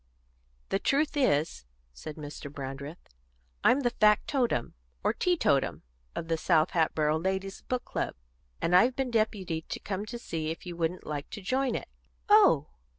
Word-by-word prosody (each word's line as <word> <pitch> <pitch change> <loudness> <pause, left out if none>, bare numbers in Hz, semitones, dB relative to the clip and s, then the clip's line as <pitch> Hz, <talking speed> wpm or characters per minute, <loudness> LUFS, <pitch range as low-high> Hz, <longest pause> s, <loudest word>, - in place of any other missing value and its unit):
"The 195 - +1
truth 290 +6 +1
is," 150 - +1 0.3
said 150 - -8
Mr. 145 -1 -8
Brandreth, 140 +3 -7 0.6
"I'm 275 - +5
the 240 -3 +1
factotum, 215 - +2 0.3
or - - +2
teetotum, 320 - +1 0.3
of 165 - -4
the 165 0 +1
South 160 -1 +3
Hatboro' 155 -2 +2
ladies' 190 +2 -2
book 250 -1 -3
club, - - -3 0.4
and 175 - +2
I've 240 +8 +5
been 265 -2 -1
deputed 195 -8 -1
to - - -3
come 195 -2 -3
and 240 - -5
see 160 -8 -3
if 165 - -6
you 175 -1 -6
wouldn't 170 +2 -2
like 145 -2 -4
to 205 - -7
join 260 +6 +1
it." - - -4 0.4
"Oh!" 405 - +6
180 Hz, 155 wpm, -29 LUFS, 155-240 Hz, 0.6 s, Oh